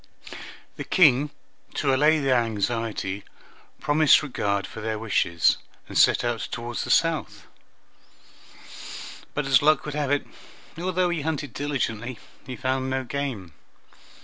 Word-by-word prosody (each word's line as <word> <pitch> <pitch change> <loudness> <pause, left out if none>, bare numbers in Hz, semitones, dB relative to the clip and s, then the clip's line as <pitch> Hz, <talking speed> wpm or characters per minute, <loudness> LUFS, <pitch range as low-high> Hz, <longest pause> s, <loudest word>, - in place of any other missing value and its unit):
The - - -4
King, 145 -5 +4 0.5
to 135 -2 +1
allay 150 +4 +4
their 135 -4 +3
anxiety, 110 -3 -2 0.6
promised 150 0 +4
regard 100 -8 -1
for 110 - -9
their 110 0 -2
wishes, 100 -6 +2 0.3
and - - -10
set - - +5
out 120 -1 -1
toward 120 0 -5
the - - -3
south; 110 - +1 1.9
but 150 - -1
as 135 -2 +4
luck 155 +1 +3
would 150 - -4
have 145 -2 -1
it, 145 0 +1 0.5
although 180 +1 0
he 170 -3 -2
hunted 145 -4 -3
diligently, 130 -4 -3 0.3
he 130 - -5
found 130 +1 -1
no 130 0 -1
game. 120 - -4
130 Hz, 130 wpm, -25 LUFS, 115-150 Hz, 1.9 s, set